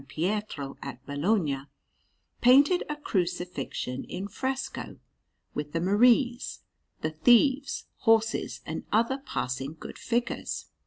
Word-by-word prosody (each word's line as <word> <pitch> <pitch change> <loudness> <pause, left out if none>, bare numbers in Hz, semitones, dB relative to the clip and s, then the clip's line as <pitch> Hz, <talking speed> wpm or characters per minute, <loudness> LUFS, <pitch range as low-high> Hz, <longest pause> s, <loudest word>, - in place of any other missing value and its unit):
Pietro 155 -1 -3
at 130 -2 -8
Bologna, 145 0 +1 0.8
painted 280 +8 +6
a 300 - -1
Crucifixion 175 - -2
in 195 +2 -5
fresco, 265 +5 -4 0.6
with 150 0 -4
the 165 - +1
Maries, 240 +7 +3 0.4
the 155 - -1
Thieves, 255 - +3
horses, 225 -1 +2
and - - -4
other 230 +5 +2
passing 135 - -3
good - - -9
figures. 235 0 -2
205 Hz, 105 wpm, -28 LUFS, 150-245 Hz, 0.8 s, painted